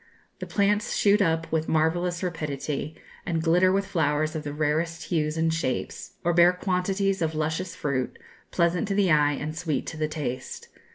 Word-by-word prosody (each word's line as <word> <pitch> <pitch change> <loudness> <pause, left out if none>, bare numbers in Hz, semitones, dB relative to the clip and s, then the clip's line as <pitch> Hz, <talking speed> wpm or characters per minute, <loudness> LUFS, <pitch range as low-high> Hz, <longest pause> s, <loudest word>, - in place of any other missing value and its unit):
The - - -6
plants 205 +1 +1
shoot 205 +1 +4
up 165 -3 0
with 160 0 0
marvellous 175 +3 +1
rapidity, 150 -3 -3 0.3
and 165 -2 -1
glitter 180 +3 +4
with 195 +1 +1
flowers 155 -3 0
of 155 - -2
the 145 -1 -5
rarest 155 +3 -1
hues 155 -2 -1
and 160 0 +1
shapes, 145 -6 -3
or 175 - +2
bear 175 +1 +6
quantities 190 +1 0
of 160 -1 0
luscious 160 +3 -2
fruit, 135 -6 -2 0.3
pleasant 175 +4 +1
to 200 - -1
the 195 -3 +3
eye 150 -1 +4
and 150 +2 -4
sweet 160 -3 -2
to 160 - -6
the 155 0 0
taste. 140 -5 -5
165 Hz, 175 wpm, -26 LUFS, 155-180 Hz, 0.3 s, bear